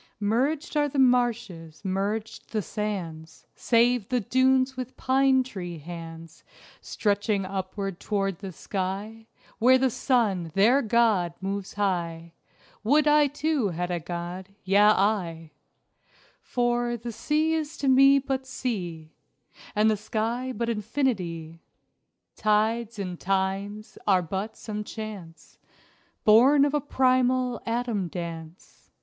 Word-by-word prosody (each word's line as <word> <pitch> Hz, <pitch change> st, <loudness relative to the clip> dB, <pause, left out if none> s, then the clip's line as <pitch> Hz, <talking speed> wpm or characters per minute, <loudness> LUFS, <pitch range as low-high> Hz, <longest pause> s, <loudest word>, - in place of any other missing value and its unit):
Merged 265 Hz, +11 st, 0 dB
are 295 Hz, -1 st, +2 dB
the 280 Hz, -, -5 dB
marshes, 240 Hz, -10 st, +1 dB
merged 200 Hz, +3 st, -3 dB
the 215 Hz, -2 st, 0 dB
sands, 170 Hz, -7 st, -5 dB
Save 235 Hz, -2 st, +2 dB
the 250 Hz, -, +1 dB
dunes 260 Hz, +3 st, +2 dB
with 255 Hz, 0 st, -7 dB
pine 265 Hz, 0 st, +3 dB
tree 180 Hz, -9 st, -7 dB
hands 165 Hz, 0 st, -10 dB, 0.4 s
Stretching 205 Hz, -1 st, 0 dB
upward 195 Hz, 0 st, -4 dB
toward 195 Hz, -4 st, -2 dB
the 195 Hz, -2 st, -7 dB
sky, 200 Hz, +5 st, -5 dB, 0.3 s
Where 255 Hz, +3 st, +6 dB
the 260 Hz, -1 st, +1 dB
sun, 205 Hz, -11 st, 0 dB
their 235 Hz, +8 st, +5 dB
god, 215 Hz, -7 st, +2 dB
moves 195 Hz, 0 st, -4 dB
high: 170 Hz, -4 st, -2 dB, 0.5 s
Would 295 Hz, +7 st, +3 dB
I 295 Hz, 0 st, +5 dB
too 290 Hz, -3 st, 0 dB
had 175 Hz, +1 st, -3 dB
a 175 Hz, -, -1 dB
god 175 Hz, +3 st, -6 dB
yea, 195 Hz, +1 st, +3 dB
I! 195 Hz, -6 st, +2 dB, 0.9 s
For, 240 Hz, -1 st, 0 dB
the 235 Hz, +1 st, -6 dB
sea 305 Hz, +8 st, 0 dB
is 315 Hz, 0 st, -3 dB
to 280 Hz, -, -2 dB
me 275 Hz, +1 st, +6 dB
but 265 Hz, -1 st, -2 dB
sea, 175 Hz, -12 st, -4 dB, 0.6 s
And 210 Hz, +1 st, +4 dB
the 215 Hz, -, +3 dB
sky 230 Hz, +4 st, -2 dB
but 235 Hz, -2 st, -3 dB
infinity. 195 Hz, -, -2 dB, 0.7 s
Tides 220 Hz, +1 st, +1 dB
and 185 Hz, -3 st, -5 dB
times 195 Hz, +2 st, -2 dB
are 185 Hz, -3 st, +4 dB
but 195 Hz, +6 st, -4 dB
some 210 Hz, -1 st, -5 dB
chance 205 Hz, -7 st, -9 dB, 0.6 s
Born 265 Hz, +7 st, +6 dB
of 290 Hz, -, -1 dB
a 295 Hz, -, +1 dB
primal 255 Hz, -2 st, +1 dB
atom 230 Hz, -5 st, -1 dB
dance. 165 Hz, -1 st, -8 dB
215 Hz, 125 wpm, -26 LUFS, 185-250 Hz, 0.9 s, Where